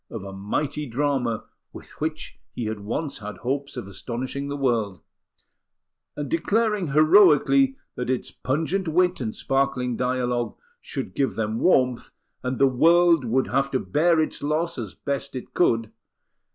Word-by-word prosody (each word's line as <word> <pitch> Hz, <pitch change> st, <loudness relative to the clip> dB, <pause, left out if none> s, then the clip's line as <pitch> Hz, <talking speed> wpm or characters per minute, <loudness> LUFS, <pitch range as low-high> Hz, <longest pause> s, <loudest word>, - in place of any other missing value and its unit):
of 110 Hz, -4 st, -6 dB
a 100 Hz, -1 st, -8 dB
mighty 145 Hz, +10 st, -3 dB
drama 125 Hz, -3 st, -1 dB, 0.3 s
with -, -, -12 dB
which 155 Hz, 0 st, -4 dB, 0.2 s
he 120 Hz, -, -3 dB
had 110 Hz, -1 st, -3 dB
once 135 Hz, +9 st, -4 dB
had 105 Hz, 0 st, -7 dB
hopes 140 Hz, +2 st, -3 dB
of 120 Hz, -, -5 dB
astonishing 125 Hz, +7 st, -5 dB
the 145 Hz, 0 st, -4 dB
world, 115 Hz, -, 0 dB, 1.2 s
and 145 Hz, -1 st, -3 dB
declaring 210 Hz, -, +1 dB
heroically 180 Hz, -, +5 dB, 0.2 s
that 125 Hz, 0 st, -4 dB
its 130 Hz, -1 st, -1 dB
pungent 165 Hz, +7 st, -1 dB
wit 180 Hz, 0 st, +2 dB
and 110 Hz, -3 st, -3 dB
sparkling 135 Hz, -2 st, 0 dB
dialogue 125 Hz, -1 st, -1 dB, 0.2 s
should -, -, -6 dB
give 135 Hz, -1 st, 0 dB
them 110 Hz, 0 st, -2 dB
warmth, 125 Hz, -8 st, +2 dB, 0.3 s
and 125 Hz, 0 st, -2 dB
the 140 Hz, -, +5 dB
world 165 Hz, +4 st, +4 dB
would 125 Hz, +3 st, +1 dB
have 135 Hz, 0 st, +1 dB
to 130 Hz, -, 0 dB
bear 165 Hz, +2 st, +2 dB
its 155 Hz, -, -1 dB
loss 155 Hz, +4 st, -1 dB
as 110 Hz, -5 st, -6 dB
best 140 Hz, -1 st, -4 dB
it 125 Hz, -, -7 dB
could. 115 Hz, -10 st, +2 dB
135 Hz, 150 wpm, -24 LUFS, 120-155 Hz, 1.2 s, heroically